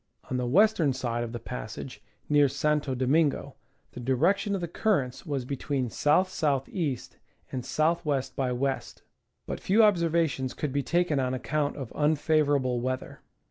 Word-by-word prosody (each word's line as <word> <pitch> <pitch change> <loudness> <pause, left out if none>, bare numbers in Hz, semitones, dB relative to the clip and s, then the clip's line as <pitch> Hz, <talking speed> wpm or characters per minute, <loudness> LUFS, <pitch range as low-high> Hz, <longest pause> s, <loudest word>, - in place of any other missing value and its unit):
On 130 - 0
the 125 -1 -1
western 175 - +4
side 120 -2 -2
of 115 - -5
the 120 - -4
passage, 115 -1 -7 0.3
near 145 -2 +4
Santo 145 0 0
Domingo, 140 +1 +1 0.4
the - - -9
direction 165 - +1
of 190 - -3
the 170 - -2
currents 165 - -1
was 140 -4 -2
between 135 0 -2
S. - - -5
S. 185 +4 +3 0.3
E, 150 -9 -1 0.5
and 130 -2 -3
S. - - -7
W. 155 -3 +2
by 135 - 0
W. 130 +2 0 0.7
But - - -4
few 215 +4 +4
observations 165 -9 +2
could 150 -4 -3
be 140 - +1
taken 170 -1 +1
on 130 -1 0
account 145 +3 -1
of 130 -5 -6
unfavorable 145 -4 +2
weather. 130 +1 -4
140 Hz, 160 wpm, -28 LUFS, 130-160 Hz, 0.7 s, western